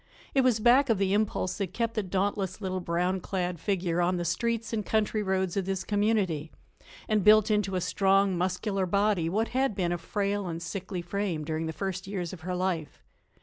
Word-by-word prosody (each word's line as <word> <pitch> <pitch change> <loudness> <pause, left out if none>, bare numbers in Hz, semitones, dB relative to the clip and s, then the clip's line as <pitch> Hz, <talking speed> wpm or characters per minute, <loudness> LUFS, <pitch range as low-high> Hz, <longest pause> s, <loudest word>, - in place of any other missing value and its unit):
It 270 - +4
was 250 -4 +3
back 250 +5 +5
of 225 - +3
the 195 0 +1
impulse 205 -3 0
that 195 -4 -3
kept 230 -1 0
the 215 - 0
dauntless, 195 0 -1
little 185 -2 -2
brown 180 +2 0
clad 180 -3 -2
figure 175 -3 0
on 180 +1 +1
the 175 - -2
streets 230 +6 -1
and 215 -2 -1
country 215 +1 0
roads 190 -2 0
of 195 -2 0
this 195 -1 -1
community 205 -7 0 0.6
and 215 -3 +2
built 215 +1 +6
into 205 -2 +1
a 180 - 0
strong, 195 +1 +2
muscular 185 +2 -1
body 200 -3 +2
what 220 +6 0
had 260 -3 0
been 175 -3 0
a 175 - -1
frail 200 +2 -2
and 165 -1 -4
sickly 185 0 -5
frame 175 -3 -2
during 160 +1 -2
the - - -2
first 190 +3 -4
years 185 -4 -4
of 175 - -9
her 180 +2 -3
life. 180 -4 -2
190 Hz, 200 wpm, -28 LUFS, 180-210 Hz, 0.6 s, built